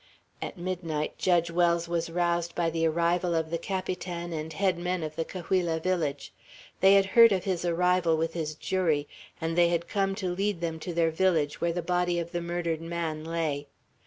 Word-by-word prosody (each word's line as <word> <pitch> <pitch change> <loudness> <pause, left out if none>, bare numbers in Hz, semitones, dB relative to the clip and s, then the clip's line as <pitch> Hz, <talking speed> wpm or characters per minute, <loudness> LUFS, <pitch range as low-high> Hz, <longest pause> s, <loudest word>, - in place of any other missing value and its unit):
At - - -5
midnight 170 -4 -3
Judge 170 -2 +2
Wells 170 0 +2
was 170 -1 -1
roused 170 0 0
by 170 -1 +1
the 165 0 +1
arrival 170 +2 +1
of 160 -1 -1
the 170 - -1
Capitan 180 -2 -4
and 155 0 -4
head 185 +1 0
men 180 -1 -2
of 155 0 -5
the 165 - -1
Cahuilla 175 -2 -1
village. 160 -5 -2 0.5
They 195 +1 +7
had 195 -1 +5
heard 230 +3 +7
of 190 -2 +1
his 185 -3 -1
arrival 175 -1 +2
with 165 +1 -1
his 155 -2 -3
jury, 160 -6 0 0.3
and 165 0 -2
they 175 0 +5
had 170 0 -1
come 195 -1 0
to 185 -3 -2
lead 195 0 -1
them 165 -1 -3
to 175 +2 -5
their 165 -1 +3
village, 160 -4 +1
where 170 - +2
the 175 0 -3
body 175 0 +1
of 170 0 -3
the 175 - -2
murdered 170 -1 -2
man 165 -2 -3
lay. 160 -3 -2
170 Hz, 195 wpm, -28 LUFS, 165-180 Hz, 0.5 s, They